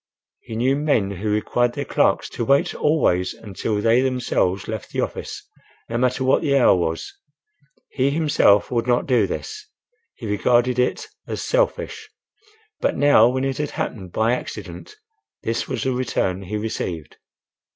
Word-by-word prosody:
He 110 - -9
knew 130 +4 +2
men 140 -9 +1
who 100 +3 -4
required 120 +3 +1
their 140 +1 -4
clerks - - +1
to - - -4
wait 140 +4 +2
always 90 - +1
until 105 0 -3
they 115 +4 +3
themselves 125 -7 0
left 110 -2 -5
the - - -5
office, - - -4 0.4
no 115 +1 -1
matter 130 +1 +1
what 130 - +3
the 140 -4 +2
hour 125 - +5
was. 80 -2 -2 0.8
He 135 0 +1
himself 140 -10 +3
would 120 -1 0
not 120 0 +2
do 120 -7 +2
this; 430 - -6 0.5
he 115 - -9
regarded 120 +4 +2
it 125 - 0 0.2
as - - -4
selfish. - - -1 0.7
But - - 0
now 140 -5 +6
when 130 +1 -1
it 135 0 -2
had 150 -1 -1
happened 95 -6 -4
by 110 +5 +1
accident, 425 - -7 0.5
this 115 +1 -2
was - - -3
the 130 - 0
return 115 -7 -1
he 100 +3 -4
received! 90 -7 -4
120 Hz, 160 wpm, -22 LUFS, 105-135 Hz, 0.8 s, now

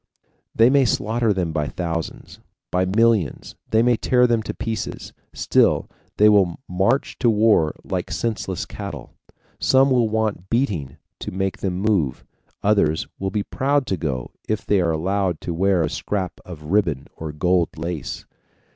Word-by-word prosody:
They 115 +3 +5
may 140 -1 +5
slaughter 115 -1 +1
them 90 -4 -1
by 75 -2 -1
thousands, 85 -2 -5 0.3
by 90 +1 +2
millions, 105 - +1 0.2
they 110 +1 +3
may 120 -1 +3
tear 125 +1 +3
them 120 -2 +2
to 110 - -5
pieces, 110 -2 -5 0.2
still - - +2 0.3
they 105 - +6
will 100 -5 +4
march 95 +9 0
to 120 - +3
war 105 -8 +3
like - - -3
senseless 110 -6 -2
cattle. - - -8 0.5
Some 135 +1 +4
will 120 -3 +3
want 110 -4 -1
beating 90 - -1 0.2
to - - -5
make 95 0 -2
them 90 -2 -2
move, 95 - 0 0.4
others 100 -7 +2
will 95 - -1
be 100 +1 -1
proud 140 +4 0
to 95 - -1
go 70 -6 -3 0.2
if 110 -1 -1
they 100 -2 +3
are 85 - +1
allowed 90 +2 0
to 85 - -3
wear 95 0 +2
a - - +1
scrap 95 -4 -3
of 85 -4 -10
ribbon 85 -10 +1
or 80 -1 -6
gold 90 +3 +1
lace. 80 -2 -5
95 Hz, 160 wpm, -22 LUFS, 85-110 Hz, 0.5 s, they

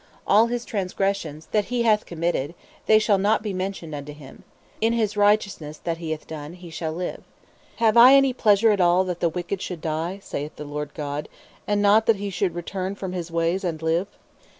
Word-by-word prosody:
All 215 +3 +5
his 240 0 -3
transgressions 190 -5 -2
that 210 -2 +2
he 245 -1 -1
hath 215 -2 +2
committed, 170 -2 -2 0.3
they 215 - +7
shall 215 -2 +2
not 210 +2 +2
be 210 -3 -3
mentioned 185 -4 -4
unto 145 0 -6
him: 145 -2 -14 0.4
in 225 +1 +2
his 220 -3 0
righteousness 205 -7 +1
that 165 -1 -3
he 165 -2 -5
hath 155 -1 -4
done 155 0 -8
he 175 -2 -12
shall 160 0 -3
live. 180 +2 -4 0.5
Have 225 -1 +2
I 250 +3 +9
any 275 -1 +4
pleasure 215 -2 +4
at 200 -2 +1
all 175 +1 +4
that 180 -2 -4
the 170 - +2
wicked 180 +3 -4
should 180 -3 -5
die? 160 +4 -3
saith 150 +2 -5
the 150 - -8
Lord 145 0 -6
God; 145 -1 -4 0.4
and 205 0 +1
not 210 +2 +4
that 225 - +5
he 200 0 -5
should 185 -2 -1
return 185 +2 -4
from 190 -2 -5
his 175 -2 -4
ways 170 +3 0
and 165 -4 -2
live?" 165 +4 0
185 Hz, 205 wpm, -24 LUFS, 160-205 Hz, 0.5 s, I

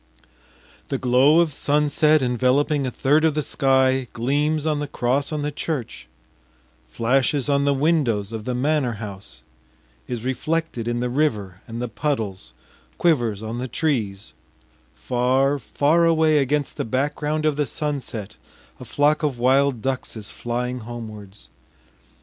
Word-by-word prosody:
The 135 - -2
glow 130 +6 +4
of 160 -4 0
sunset 150 +1 +2
enveloping 130 +3 +1
a - - 0
third 145 +5 +2
of 160 -2 +2
the 150 - 0
sky 130 -2 +2
gleams 145 +6 0
on 155 -2 0
the 145 - -3
cross 135 +2 -1
on 150 -1 -2
the 150 - -1
church, 145 -4 -5 0.8
flashes 130 - +1
on 140 0 +2
the 140 - +3
windows 135 - +1
of 110 -1 -6
the 125 - -2
manor 135 -1 +1
house, 100 - -9 0.6
is 120 -1 -5
reflected 140 -2 -2
in 120 0 -1
the 125 - -1
river 105 -10 -1
and 115 +1 -5
the - - -2
puddles, 105 - -3 0.4
quivers 120 - +1
on 115 +2 -4
the 130 - -3
trees; 110 - -2 0.6
far, 130 +3 +1
far 150 +7 +2
away 160 -2 +4
against 145 +1 -1
the - - -1
background 150 +5 -1
of 155 -2 +2
the 145 -1 0
sunset, 130 -9 -4 0.4
a 125 - -9
flock 145 +6 +2
of 145 -5 -1
wild 130 0 +2
ducks 130 -2 -3
is 105 -3 -8
flying 125 +1 -3
homewards.... 110 -4 -9
130 Hz, 145 wpm, -22 LUFS, 120-150 Hz, 0.8 s, glow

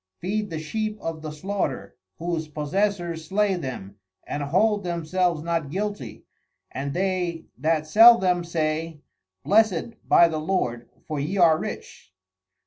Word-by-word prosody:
_Feed 210 +3 -2
the 165 - -4
Sheep 215 +7 -3
of 165 -3 -5
the 155 - -5
slaughter, 190 +7 -4 0.2
whose 165 -2 -3
Possessors 170 +2 -2
slay 200 +2 +2
them, 125 - -6 0.3
and 145 - -4
hold 200 +8 +2
themselves 170 -1 -1
not 165 -4 -1
guilty, 190 - -5 0.5
and 140 +1 -4
they 180 -3 -1
that 155 +3 0
sell 225 +9 +8
them 180 -3 +1
say, 160 -1 -2 0.4
Blessed 220 0 +1
by 170 - +7
the 160 -2 -3
Lord, 125 -9 -2 0.2
for 155 -2 -3
ye 160 +8 -2
are 170 -3 +6
rich. 95 - -8
170 Hz, 135 wpm, -24 LUFS, 155-195 Hz, 0.5 s, sell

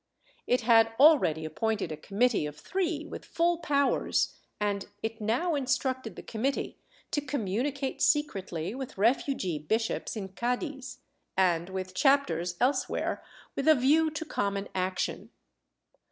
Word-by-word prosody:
It 250 - +2
had 225 -1 +5
already 265 - +5
appointed 215 +1 -1
a - - -3
committee 200 +2 +1
of 150 - -9
three 340 -5 -2
with - - -8
full 340 0 +1
powers, 280 -4 +1 0.2
and 205 -1 -1 0.2
it 225 0 -4
now 245 +11 +1
instructed 260 - -1
the - - -9
committee 255 +5 -2 0.3
to 290 - 0
communicate 270 +2 -2
secretly 195 - 0
with 265 -3 -7
refugee 210 - +1
bishops 220 +13 -1
in 195 -3 -5
Cddiz, 250 - -3 0.4
and 175 -2 +2
with 185 -1 -5
chapters 180 - +2
else 260 +3 +2
where, - - -2 0.3
with 275 - -2
a 315 - +8
view 300 +5 +4
to 315 +1 -5
common 200 -8 -2
action. 185 0 -2
235 Hz, 135 wpm, -29 LUFS, 190-280 Hz, 0.4 s, a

